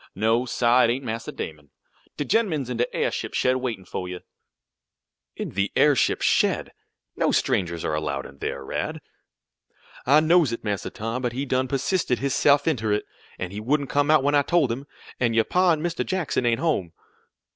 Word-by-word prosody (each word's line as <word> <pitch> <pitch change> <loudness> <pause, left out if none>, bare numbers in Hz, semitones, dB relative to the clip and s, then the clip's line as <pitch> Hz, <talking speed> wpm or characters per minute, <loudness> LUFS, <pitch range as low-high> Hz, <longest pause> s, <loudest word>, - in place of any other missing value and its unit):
No, 115 +5 +1
sah, 120 +1 +3
it - - +1
ain't 130 +3 -1
Massa 115 0 -4
Damon. 75 -2 -7 0.5
De 145 - -2
gen'man's 165 - 0
in 120 - -3
de 120 - 0
airship - - -2
shed 130 0 +2
waitin' 115 -7 -4
fo' 90 - -5
you." 90 0 -7 1.1
"In - - -4
the 100 +1 -1
airship 145 -3 +3
shed! - - +2 0.4
No - - +1
strangers 85 -3 0
are 80 - -1
allowed 75 -3 -2
in - - -13
there, 70 - -4
Rad." - - -3 1.1
"I 145 +3 +7
knows 160 -3 +4
it, 115 - -5
Massa 100 -3 -2
Tom, 115 +4 -4
but 120 -2 -2
he 135 +3 -3
done 130 -1 0
persisted 135 +1 0
his 140 0 -1
se'f 145 0 +4
inter 110 -9 0
it, 105 - 0 0.3
an' 90 - -5
he 100 - -5
wouldn't 140 +5 0
come 145 +1 +2
out 155 -3 +5
when 145 +1 +2
I 145 - +5
told 145 -3 +2
him; 135 +5 -5 0.3
an' 115 -2 +1
your 115 - +4
pa 180 0 +3
an' 155 -2 0
Mr. 175 0 -1
Jackson 170 -9 -1
ain't 115 0 +2
home." 100 - 0
125 Hz, 190 wpm, -24 LUFS, 110-145 Hz, 1.1 s, I